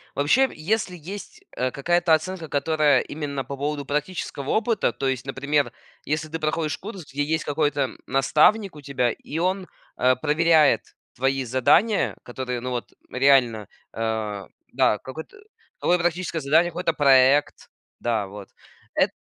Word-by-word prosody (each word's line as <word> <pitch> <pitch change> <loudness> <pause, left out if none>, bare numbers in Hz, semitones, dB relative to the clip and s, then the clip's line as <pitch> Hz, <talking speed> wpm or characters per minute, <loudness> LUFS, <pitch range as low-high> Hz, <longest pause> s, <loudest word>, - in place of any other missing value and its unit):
Вообще, 245 - +3
если 185 +3 -2
есть, 195 +6 -9
э, 130 - 0
какая-то 175 +3 +2
оценка, 165 +1 -5
которая 145 -1 +2
именно 145 -3 -4
по 140 +3 -6
поводу 145 +1 -3
практического 150 -1 -3
опыта, 225 -1 +1
то 135 - -3
есть, 130 -1 -2
например, 140 +2 0 0.3
если 155 +1 -2
ты 165 - -4
проходишь 155 0 -1
курс, 195 -5 -8
где 145 +2 -1
есть 160 +2 -1
какой-то, 145 -1 0
м, 135 - -3
наставник 155 +9 +3
у 150 - -10
тебя, 125 -4 0
и 150 - -7
он, 185 +2 -1 0.3
э, 130 +1 +4
проверяет 155 +2 +3 0.3
твои 135 +1 0
задания, 130 - +2
которые 125 0 -4
ну 125 +1 -5
вот 120 -1 -4 0.2
реально, 130 -5 +3 0.3
а 110 -3 -3 0.2
да, 105 - +3
какое-то, 160 - -10 0.4
какое 180 0 +2
практическое 175 0 -1
задание, 160 +5 +3
какой-то 170 0 -1
проект. 140 -1 +4 0.3
Да, 115 -4 0
вот, 100 0 -10 0.5
эт - - +3
145 Hz, 145 wpm, -24 LUFS, 130-165 Hz, 0.5 s, э